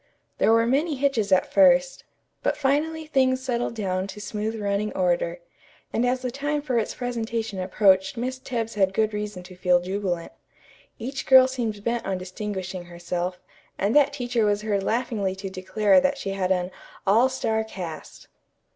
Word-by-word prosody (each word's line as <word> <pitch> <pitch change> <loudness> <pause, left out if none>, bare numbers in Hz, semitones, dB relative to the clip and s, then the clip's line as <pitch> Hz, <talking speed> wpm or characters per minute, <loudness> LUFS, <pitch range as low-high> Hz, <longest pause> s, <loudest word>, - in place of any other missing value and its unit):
There - - +4
were 230 0 +4
many 290 +6 +1
hitches 255 -7 0
at 185 - +3
first, 270 -2 +4 0.4
but - - 0
finally 300 +3 0
things 260 -4 +2
settled 245 -2 -2
down 190 -3 -2
to 200 +2 -9
smooth 215 +2 -3
running 205 +1 -1
order, 175 -1 +1 0.5
and 240 +2 +1
as 255 +1 0
the 250 - -2
time 290 +3 -2
for 255 -5 +1
its 220 - -3
presentation 230 -4 -3
approached 190 +2 +3
Miss 255 +2 -3
Tebbs 230 -4 -3
had 195 -2 +1
good 215 -1 +1
reason 210 -3 -4
to 185 +1 -12
feel 180 0 +3
jubilant. 180 -2 -3 0.7
Each 260 +4 -5
girl 260 -1 +8
seemed 230 -6 -3
bent 235 +1 -1
on 190 -1 -2
distinguishing 185 -1 -5
herself, 175 +1 -4 0.4
and 200 +6 0
that 290 -1 +5
teacher 245 -4 -1
was 205 0 +1
heard 205 -2 0
laughingly 215 -3 -1
to 190 0 -6
declare 205 +7 +3
that 280 0 +1
she 195 -8 -4
had 190 -1 -1
an 180 0 0 0.3
"all 225 +7 +4
star 220 -4 -1
cast." 175 -7 -8
215 Hz, 170 wpm, -25 LUFS, 190-255 Hz, 0.7 s, girl